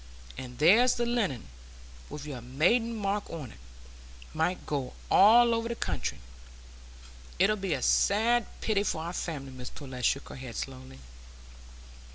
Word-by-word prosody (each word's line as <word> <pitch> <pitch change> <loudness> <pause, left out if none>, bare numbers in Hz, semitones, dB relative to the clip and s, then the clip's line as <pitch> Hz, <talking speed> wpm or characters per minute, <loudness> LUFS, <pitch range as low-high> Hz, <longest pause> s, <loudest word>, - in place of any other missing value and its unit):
And 125 -1 -8
there's 220 - +5
the 240 - -1
linen, 210 - -1 0.6
with 150 0 -7
your 135 -5 -6
maiden 180 - +1
mark 205 -1 -2
on, 150 -8 -7 0.8
might 160 +3 -1
go 140 -4 -3 0.2
all 235 +4 +7
over 230 0 -1
the 235 - -3
country. 70 - -3 1.2
It 195 +4 +4
'ud 215 -2 -2
be 190 -5 0
a 130 - -4
sad 225 +3 +3
pity 210 -3 +1
for 165 -5 -2
our 170 +2 -5
family." 145 -7 -5
Mrs 125 -1 -9
Pullet 130 -3 -8
shook 140 +4 +1
her - - -8
head 125 -3 -8
slowly. 130 - -7
170 Hz, 150 wpm, -29 LUFS, 130-220 Hz, 1.2 s, all